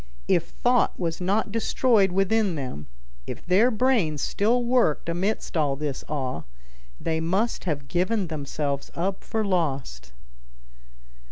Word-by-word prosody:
If - - +3
thought - - +1
was 165 0 -2
not 205 +4 +1
destroyed 225 -2 +3
within 195 0 +2
them, 125 - -5 0.4
if - - -7
their 200 +7 +4
brains 215 - +1
still 235 +4 +1
worked 240 -12 +2
amid 180 +6 0 0.2
all 145 -4 +2
this 145 -1 -4
awe, 130 - -2 0.6
they 160 -1 -1
must 190 +9 0
have 145 -6 -2
given 185 +5 0
themselves 145 -2 -3
up 190 +3 -2
for 220 -1 -1
lost. 135 - -2
175 Hz, 125 wpm, -25 LUFS, 145-210 Hz, 0.6 s, their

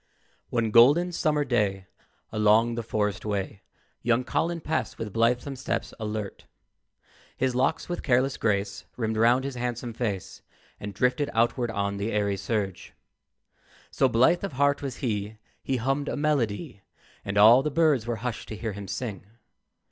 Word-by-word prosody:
One 115 -2 0
golden 145 +11 +6
summer 150 -4 +1
day, 105 -7 0 0.5
Along 110 +2 +3
the 120 - -3
forest 105 -2 -2
way, 100 -1 -3 0.4
Young 120 +2 +2
Colin 170 +6 -1
passed 160 0 -2
with 105 -3 -5
blithesome 120 +4 +1
steps 130 - -3
alert. 105 -2 -5 0.9
His 130 0 0
locks 135 +6 0
with 175 - -3
careless 130 +1 +2
grace 100 -2 -1
Rimmed 110 -2 -1
round 120 +4 +4
his 140 0 -4
handsome 120 -1 -4
face 105 -6 -4 0.4
And 100 -1 -7
drifted 130 +6 +1
outward 120 +1 +1
on 100 -2 -2
the 100 +3 -2
airy 100 -1 +1
surge. 100 -1 -3 1.0
So 135 - +2
blithe 130 +11 +3
of 195 - -3
heart 140 +2 +2
was 135 -4 -5
he, 105 -1 -2 0.2
He 135 - -1
hummed 135 +4 -1
a - - -3
melody, 140 -5 -1 0.4
And 100 +1 -3
all 115 +5 +8
the 150 - -1
birds 150 -6 +2
were 120 - -1
hushed 120 -2 -4
to 110 - -5
hear 110 0 -3
him 100 0 -8
sing. 100 -1 -5
115 Hz, 155 wpm, -26 LUFS, 105-135 Hz, 1.0 s, all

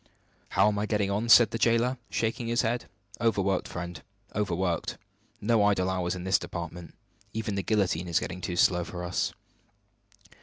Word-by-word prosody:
"How 95 +2 +6
am 105 -1 +1
I 105 - -1
getting 105 -2 0
on?" 110 +4 -1
said 115 -1 +8
the 115 - -3
jailer, 120 +3 +2
shaking 115 +1 -1
his 120 +1 +1
head. 120 +2 -1 0.4
"Overworked, 100 -5 +1
friend 90 0 -6 0.3
overworked. 95 -4 -1 0.4
No 110 0 +3
idle 95 -2 +2
hours 90 -1 -1
in 90 0 -6
our 95 - -3
department. 85 -2 -2 0.4
Even 110 -1 -2
the 100 - -1
guillotine 95 -4 0
is 85 -2 +2
getting 90 - -5
too 90 0 -3
slow 90 0 +3
for 90 +1 -6
us!" 90 +1 -1
100 Hz, 165 wpm, -28 LUFS, 90-110 Hz, 0.4 s, said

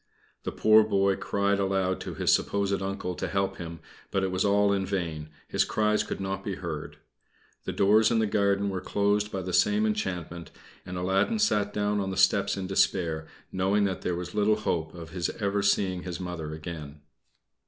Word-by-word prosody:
The - - -2
poor 110 0 +5
boy 100 -2 +2
cried 100 0 0
aloud 95 -1 0
to - - -6
his - - +3
supposed 100 -1 0
uncle 95 -1 -3
to - - -4
help 100 -1 -1
him; 85 -1 -7 0.3
but 95 - 0
it 95 - 0
was 95 0 0
all 100 0 +3
in 100 -1 0
vain, 85 -6 -3 0.2
his - - +2
cries 105 0 +1
could - - -4
not 95 0 -3
be 100 -2 -3
heard. 80 -5 -6 0.7
The - - -2
doors 105 +3 +4
in 115 - +2
the 110 - +3
garden 100 -1 +1
were 95 -1 -3
closed 105 +1 0
by 95 -1 -3
the 90 0 -5
same 210 - +3
enchantment, 90 - -3 0.4
and 90 0 -5
Aladdin 95 - +1
sat 105 - +2
down 105 0 0
on 95 -1 -2
the 95 - -4
steps 100 +1 +3
in 95 - -3
despair, 85 -4 +1 0.2
knowing 95 +2 +1
that 95 -2 -1
there 90 - -1
was 90 0 -6
little 105 0 +3
hope 85 -7 -2
of 85 -1 -9
his 90 -1 -2
ever 100 -1 0
seeing 95 -2 +1
his 90 -1 -5
Mother 90 -4 -5
again. 75 -2 -7
95 Hz, 195 wpm, -27 LUFS, 90-100 Hz, 0.7 s, poor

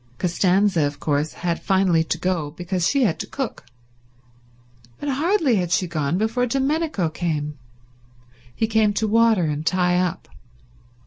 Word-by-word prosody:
Costanza 185 0 +2
of 145 - -7
course 150 +1 -1
had 170 -1 -1
finally 190 -4 +2
to 165 - -2
go 170 -3 -1
because 175 +2 -2
she 275 -2 +2
had 190 -9 +1
to - - -4
cook, 265 - -5 1.3
but - - -5
hardly 295 - +2
had 175 -2 -2
she 185 - +2
gone 155 -2 -1
before 225 +4 0
Domenico 275 - 0
came. 150 -3 -3 1.0
He 225 - +1
came 220 -2 +2
to 220 +1 0
water 225 -3 +3
and 150 -1 -2
tie 180 +1 +2
up. 180 -2 -2
185 Hz, 145 wpm, -22 LUFS, 165-225 Hz, 1.3 s, water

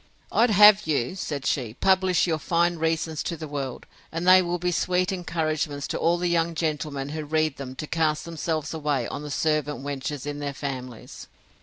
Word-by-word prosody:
I'd 235 +2 +4
have 210 -1 +7
you, 145 +1 0
said 145 -7 -4
she, 120 -5 -1
publish 190 0 +3
your 160 -3 0
fine 170 +2 +1
reasons 160 -1 -1
to 170 - -3
the 155 - -6
world, 140 -3 -5 0.3
and 165 +2 -3
they 185 0 +8
will 175 0 -1
be 180 +1 -1
sweet 180 +2 +1
encouragements 155 -5 -2
to - - -2
all 170 +1 +2
the 175 +1 -1
young 170 -1 +1
gentlemen 150 -3 -2
who 155 +1 -4
read 155 -1 0
them 130 -2 -7
to 155 - -5
cast 155 -1 0
themselves 160 -2 -3
away 150 -6 -1
on - - -5
the 150 - -7
servant 150 -1 -1
wenches 145 0 -4
in 145 0 -4
their 140 -1 -4
families. 130 -4 -7
155 Hz, 190 wpm, -25 LUFS, 145-170 Hz, 0.3 s, they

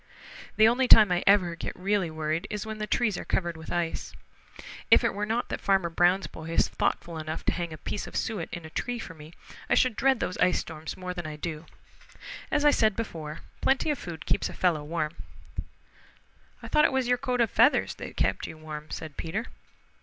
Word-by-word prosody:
The 220 0 +6
only 250 +3 +3
time 215 -5 +8
I 175 0 +1
ever 185 -4 +5
get - - -5
really 190 -1 0
worried 155 +3 -2
is 210 +1 -4
when 220 0 -6
the 215 - -3
trees 215 -6 +1
are - - -5
covered 175 -2 -1
with 160 0 -9
ice. 170 -1 -2 0.8
If - - +7
it - - +1
were 205 +1 -2
not 230 +2 -1
that - - -4
Farmer 190 -4 +2
Brown's 175 +2 +3
boy 160 +2 -8
is 165 - +3
thoughtful 170 -1 -2
enough 155 0 -5
to - - +3
hang 175 -2 -3
a 155 - -7
piece 205 - -4
of - - -10
suet 200 -8 -2
in 170 -1 -6
a 160 - -10
tree 245 +7 -2
for 180 - -7
me, 155 +1 -13 0.4
I - - +4
should 255 -4 +3
dread 265 +1 +3
those 185 - -3
ice 180 - +4
storms 160 -1 -6
more 180 0 -5
than 175 -3 -5
I 155 - -6
do. 155 +1 -6 0.8
As 295 -1 +1
I 295 - +7
said 215 -6 +3
before, 160 -9 -5 0.2
plenty 270 +3 +2
of 290 - -3
food 165 -3 -7
keeps - - 0
a - - -8
fellow 170 -5 +1
warm." 155 +1 -3 1.5
"I - - -6
thought 300 - +4
it - - +3
was 265 -2 0
your 245 0 +2
coat 250 -1 -1
of 230 -2 +2
feathers - - +4
that - - -8
kept - - 0
you 160 - -9
warm," 155 -1 -8
said 155 -3 -7
Peter. 200 +8 -3
180 Hz, 220 wpm, -28 LUFS, 160-220 Hz, 1.5 s, time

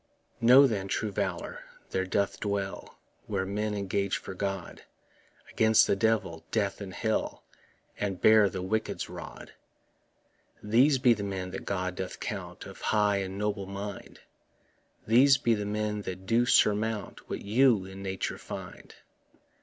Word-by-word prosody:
Know, 125 +4 +8
then, 100 -7 -1
true 105 +2 -2
valour 95 -3 -3 0.3
there 95 0 -1
doth 100 +1 0
dwell 100 -1 -4 0.3
Where 95 - -1
men 105 +2 -2
engage 100 0 -1
for - - -8
God 95 -2 -4 0.7
Against 110 -1 +5
the - - +2
Devil, 100 -6 0
death 100 -2 -1
and 95 -2 -6
hell, 110 +3 -2 0.6
And 100 -3 -2
bear 110 -2 +6
the 95 0 -5
wicked's 110 +4 -2
rod. - - -9 1.1
These 125 +7 +4
be 125 -1 +5
the 105 - -5
men 95 -2 -4
that - - -6
God 95 -2 -2
doth 95 - -5
count - - -6
Of - - -11
high 105 -2 +2
and 95 0 -4
noble 105 -1 -2
mind; 100 +1 -7 0.8
These 135 +5 +6
be 120 - +2
the 105 -2 -2
men 105 0 -2
that 95 -1 -7
do 120 +4 +2
surmount 105 -1 +1
What - - -4
you 110 -1 +3
in 95 +1 -9
nature 95 -1 -3
find. - - -9
100 Hz, 145 wpm, -29 LUFS, 95-110 Hz, 1.1 s, Know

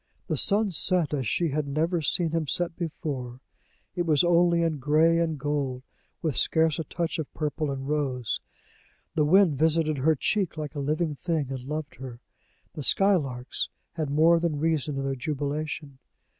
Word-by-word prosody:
The - - -2
sun 205 0 +5
set 170 -1 +2
as 135 -5 -1
she 170 +7 0
had 150 0 -2
never 160 +4 0
seen 160 +3 +1
him 165 -2 -1
set 170 +3 0
before; 140 -7 -5 0.6
it 175 - 0
was 150 -1 +4
only 170 0 +3
in 160 -3 -1
gray 155 +4 +3
and 160 -2 -1
gold, 140 -3 -2 0.4
with 155 -4 -1
scarce 160 -2 +2
a - - -1
touch 170 +2 -3
of 155 - -5
purple 150 -1 -2
and 135 -1 -4
rose; 135 -6 -2 0.7
the 155 -3 +2
wind 170 -3 +4
visited 155 -2 +2
her 160 +4 +3
cheek 190 +3 -1
like 150 -1 -5
a 145 - -5
living 155 +3 -1
thing, 145 -2 -2
and 130 -1 -4
loved 150 -1 -5
her; 125 -2 -9 0.5
the 150 - -6
skylarks 140 -7 +3 0.2
had 155 -4 -3
more 160 +4 +4
than 165 -3 -1
reason 155 -2 -1
in 135 - -2
their 135 0 -1
jubilation. 145 0 -4
155 Hz, 170 wpm, -26 LUFS, 140-165 Hz, 0.7 s, sun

